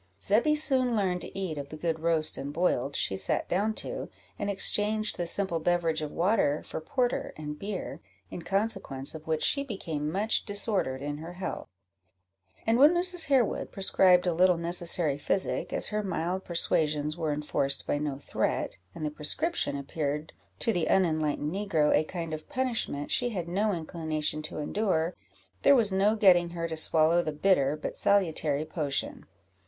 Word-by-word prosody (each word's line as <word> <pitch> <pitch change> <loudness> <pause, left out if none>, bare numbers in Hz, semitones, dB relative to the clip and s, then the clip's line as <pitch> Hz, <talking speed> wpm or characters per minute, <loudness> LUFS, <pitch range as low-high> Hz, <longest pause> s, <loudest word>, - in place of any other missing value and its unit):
Zebby 230 - +2
soon 260 -5 +4
learned 185 -4 0
to - - -7
eat 165 -6 -3
of 140 - -7
the 155 - -8
good 160 0 -2
roast 160 -1 +2
and 140 +1 -5
boiled 145 -4 0
she 95 - 0
sat 95 -1 0
down 210 +4 0
to, - - -4 0.3
and 205 - -2
exchanged 210 +2 +2
the 175 - -3
simple 180 -2 +1
beverage 165 -1 0
of 150 -1 -4
water 170 -5 +1
for - - -6
porter 245 - -1
and 150 -1 -6
beer, 200 -2 -5 0.3
in 175 - -6
consequence 175 -8 -1
of 160 0 -10
which 160 -1 -1
she 280 - +3
became 165 - -4
much 205 +5 +1
disordered 200 - 0
in 145 0 -4
her 165 +3 -8
health; 185 +1 -6 1.0
and 225 +2 +2
when 300 +5 +7
Mrs. 355 -1 +3
Harewood 265 -6 +1
prescribed 185 -2 +4
a 175 - +1
little 180 +1 +4
necessary 170 -3 0
physic, 190 +6 -1
as - - -2
her 210 0 -1
mild 185 -1 -2
persuasions 155 -3 0
were 160 -3 -2
enforced 145 -2 -1
by 145 - -1
no 145 -2 -3
threat, 140 - -2 0.2
and 155 - -4
the 150 - -2
prescription 150 - 0
appeared 145 +2 -4 0.2
to 230 - 0
the 175 -4 -1
unenlightened 155 -4 +1
negro 190 -7 +1
a - - +3
kind 165 -1 -5
of 155 0 -7
punishment 250 - -2
she 245 - +1
had 180 -7 -4
no 205 +5 0
inclination 160 -3 -3
to 155 - -6
endure, 170 +1 -1 0.5
there 280 - +6
was 215 -6 +3
no 200 +3 +3
getting 180 -5 +5
her 170 -1 -4
to 160 - -4
swallow 160 +1 +3
the 155 - -3
bitter 150 -3 +2
but 150 - -5
salutary 160 -7 +1
potion. 155 -4 -3
170 Hz, 170 wpm, -28 LUFS, 155-200 Hz, 1.0 s, when